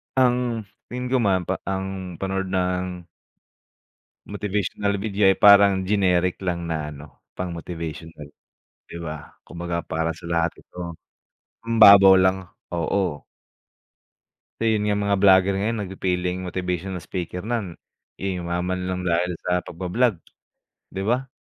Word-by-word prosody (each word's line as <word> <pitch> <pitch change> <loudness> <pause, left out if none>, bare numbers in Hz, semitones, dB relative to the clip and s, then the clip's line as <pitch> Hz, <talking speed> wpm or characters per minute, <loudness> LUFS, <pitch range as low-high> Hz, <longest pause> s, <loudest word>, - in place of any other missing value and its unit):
Ang 125 -3 +2 0.2
hil 125 0 -5
ko 130 - +3
man 95 -5 +2
pa 95 +2 -3
ang 95 -1 -4
panood 95 +2 -3
ng 90 -1 -2 1.2
motivational 100 0 -2
video 100 -1 +2
ay 95 - +3
parang 100 -2 +6
generic 90 -3 +1
lang 85 -2 -2
na 80 -2 -3
ano, 75 0 -13 0.2
pang-motivational 85 -3 -6 0.6
di - - -9
ba? 75 -2 -7
Kumbaga 85 0 -4
para 80 0 -2
sa 85 +1 -10
lahat 85 -1 +1
ito. 85 -1 -8 0.7
Hmm 115 0 -1
babaw 100 -3 +9
lang 95 0 +2 0.3
oo. 85 -2 -1 1.4
Eh, 115 - +3
yun - - -1
nga 105 - +2
mga 100 0 +2
vlogger 95 0 +5
ngayon 115 +3 -1
nag 95 - -7
fe-feling 90 -1 -1
motivational 90 0 -3
speaker 90 -1 -5
nan 110 -6 -3 0.4
eh, 95 -2 -3
yumaman 90 +1 -2
lang 90 0 -2
dahil 90 0 +1
sa 90 0 +1
pagba-vlog 95 +7 -1 0.8
di 95 - -2
ba? 125 +5 0
95 Hz, 130 wpm, -23 LUFS, 85-100 Hz, 1.4 s, babaw